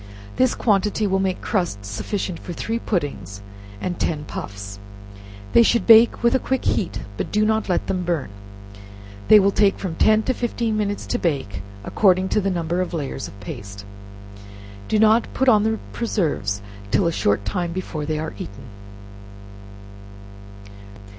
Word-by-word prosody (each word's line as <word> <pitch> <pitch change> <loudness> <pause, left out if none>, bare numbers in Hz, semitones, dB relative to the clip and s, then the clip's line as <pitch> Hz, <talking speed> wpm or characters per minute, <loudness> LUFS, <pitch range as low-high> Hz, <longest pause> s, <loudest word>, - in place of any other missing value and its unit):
This 255 -1 +3
quantity 210 0 +1
will 190 -1 +1
make 190 -1 -1
crust 175 - -1
sufficient 175 - -4
for 175 - -7
three 225 +7 -3
puddings 100 - -3 0.4
and 180 - -4
ten 150 -3 -1
puffs. 100 -4 -7 0.7
They - - +7
should 235 -3 +3
bake 230 +1 +7
with 235 - +4
a 265 - +3
quick 265 0 -1
beat, 190 - -1 0.2
but - - -3
do 210 +1 +2
not 220 -1 0
let 180 - +1
them 185 -1 -2
burn, 170 - -2 1.0
they 215 - +9
will 200 0 +3
take 200 -1 +3
from 185 -4 -4
ten 215 +6 +3
to 260 - 0
fifteen 235 -2 -2
minutes 205 -1 -2
to - - -2
bake, 135 - -2 0.2
according 185 - +2
to 210 - +2
the 195 - 0
number 175 -1 -1
of 180 -1 -3
layers 145 -4 -4
of 100 +3 -13
paste. 100 0 -8 1.0
Do 215 - +1
not 220 +2 +4
put 265 - +1
on 215 -4 +6
the 220 +1 +1 0.2
preserves 145 - -1 0.3
till 175 - +2
a 170 - +2
short 100 -9 0
time 170 - -2
before 170 -4 -4
they 155 -1 -1
are 155 -4 -4
eaten. 100 +6 -8
185 Hz, 160 wpm, -22 LUFS, 145-215 Hz, 1.0 s, they